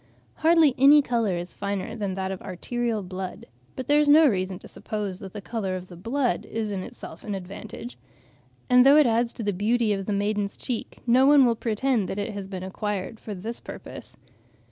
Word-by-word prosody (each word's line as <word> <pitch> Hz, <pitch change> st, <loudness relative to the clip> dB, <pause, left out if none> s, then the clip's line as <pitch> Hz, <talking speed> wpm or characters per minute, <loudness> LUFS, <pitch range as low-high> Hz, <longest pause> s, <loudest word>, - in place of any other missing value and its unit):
Hardly 320 Hz, -3 st, +5 dB
any 285 Hz, +2 st, +7 dB
colour 230 Hz, -8 st, 0 dB
is 175 Hz, +1 st, -6 dB
finer 200 Hz, 0 st, -4 dB
than 200 Hz, -4 st, -3 dB
that 190 Hz, 0 st, -3 dB
of 190 Hz, -, -6 dB
arterial 225 Hz, +3 st, -3 dB
blood; 185 Hz, 0 st, -6 dB, 0.3 s
but 260 Hz, -, -5 dB
there 290 Hz, +3 st, +4 dB
is 300 Hz, -1 st, +3 dB
no 310 Hz, +2 st, +8 dB
reason 185 Hz, -5 st, -1 dB
to -, -, -13 dB
suppose 205 Hz, -3 st, -5 dB
that 190 Hz, -2 st, -9 dB
the 205 Hz, -, -6 dB
colour 195 Hz, -3 st, -3 dB
of 185 Hz, 0 st, -7 dB
the 175 Hz, -, -10 dB
blood 240 Hz, +8 st, -1 dB
is 220 Hz, -2 st, -3 dB
in 195 Hz, -2 st, -3 dB
itself 160 Hz, -2 st, -9 dB
any 205 Hz, -2 st, -3 dB
advantage; 205 Hz, +6 st, -9 dB, 0.7 s
and 250 Hz, -1 st, +6 dB
though 275 Hz, +3 st, +7 dB
it 305 Hz, -, +6 dB
adds 235 Hz, 0 st, +2 dB
to 230 Hz, -, -6 dB
the 205 Hz, -1 st, 0 dB
beauty 215 Hz, +3 st, +1 dB
of 195 Hz, -1 st, -4 dB
the -, -, -1 dB
maiden's 205 Hz, 0 st, -1 dB
cheek, 245 Hz, -4 st, -5 dB
no 255 Hz, +3 st, +5 dB
one 285 Hz, -2 st, +7 dB
will 235 Hz, -1 st, +2 dB
pretend 225 Hz, -2 st, 0 dB
that -, -, -4 dB
it 205 Hz, +1 st, -3 dB
has 200 Hz, -1 st, -6 dB
been 190 Hz, -2 st, -6 dB
acquired 205 Hz, +2 st, -4 dB
for 210 Hz, -, -7 dB
this 220 Hz, +6 st, -6 dB
purpose. -, -, -10 dB
210 Hz, 210 wpm, -25 LUFS, 190-245 Hz, 0.7 s, no